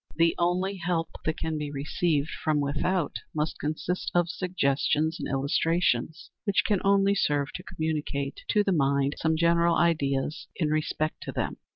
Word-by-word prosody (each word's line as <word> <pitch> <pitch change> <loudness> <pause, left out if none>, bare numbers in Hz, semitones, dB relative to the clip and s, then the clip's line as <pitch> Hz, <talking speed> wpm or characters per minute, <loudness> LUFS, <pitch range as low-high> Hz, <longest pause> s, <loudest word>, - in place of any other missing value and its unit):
The 165 +1 +4
only 180 +3 +1
help 170 -2 -1 0.2
that 155 - 0
can 160 -1 -2
be 150 -1 -3
received 145 +2 -1
from 155 -1 +2
without 150 +4 0 0.2
must 155 +1 -1
consist 155 +4 -2
of 175 -1 +3
suggestions 160 -3 0
and - - -4
illustrations, 140 +1 0
which 200 -3 +2
can 205 -4 +1
only 200 0 +4
serve 145 -7 0
to 180 - -6
communicate 150 -4 -3
to 210 -2 +3
the 195 - +1
mind 140 -3 +2
some 160 0 +1
general 170 0 +3
ideas 150 -4 +1
in 155 -4 0
respect 155 0 -1
to - - -4
them. - - -3
160 Hz, 160 wpm, -27 LUFS, 145-175 Hz, 0.2 s, The